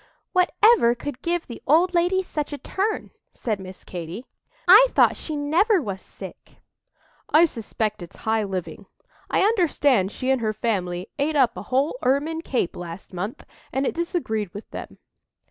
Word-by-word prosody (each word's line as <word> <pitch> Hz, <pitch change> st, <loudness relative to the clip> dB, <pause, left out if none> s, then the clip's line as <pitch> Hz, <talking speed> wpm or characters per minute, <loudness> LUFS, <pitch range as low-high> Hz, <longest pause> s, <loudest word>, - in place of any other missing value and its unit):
"Whatever 365 Hz, -, +4 dB
could 270 Hz, +2 st, -6 dB
give 345 Hz, 0 st, -1 dB
the 235 Hz, -, -9 dB
old 340 Hz, +6 st, +4 dB
lady 355 Hz, +2 st, +2 dB
such 300 Hz, -5 st, -4 dB
a 290 Hz, -, -4 dB
turn?" 405 Hz, +8 st, -2 dB, 0.2 s
said 215 Hz, -4 st, -3 dB
Miss 185 Hz, 0 st, -10 dB
Katy. 180 Hz, +7 st, -7 dB, 0.4 s
"I 420 Hz, +8 st, +9 dB
thought -, -, +4 dB
she 310 Hz, -, -6 dB
never 345 Hz, +9 st, +3 dB
was 195 Hz, -, -5 dB
sick." -, -, -12 dB, 0.7 s
"I 320 Hz, +3 st, +6 dB
suspect 220 Hz, -, -3 dB
it's 175 Hz, -, -10 dB
high 220 Hz, 0 st, +2 dB
living. 190 Hz, -3 st, -5 dB, 0.4 s
I -, -, +2 dB
understand 290 Hz, -, +2 dB
she 260 Hz, +3 st, -1 dB
and 265 Hz, -2 st, +1 dB
her 215 Hz, -1 st, 0 dB
family 185 Hz, -4 st, -2 dB
ate 300 Hz, +2 st, +1 dB
up 255 Hz, -5 st, +3 dB
a -, -, -6 dB
whole 275 Hz, -, +1 dB
ermine 295 Hz, +5 st, +1 dB
cape 250 Hz, -, -1 dB
last 175 Hz, +2 st, -8 dB
month, 190 Hz, +6 st, -5 dB, 0.3 s
and 265 Hz, +2 st, 0 dB
it -, -, 0 dB
disagreed 265 Hz, -, -2 dB
with 205 Hz, -, -8 dB
them." -, -, -8 dB
265 Hz, 165 wpm, -24 LUFS, 210-340 Hz, 0.7 s, I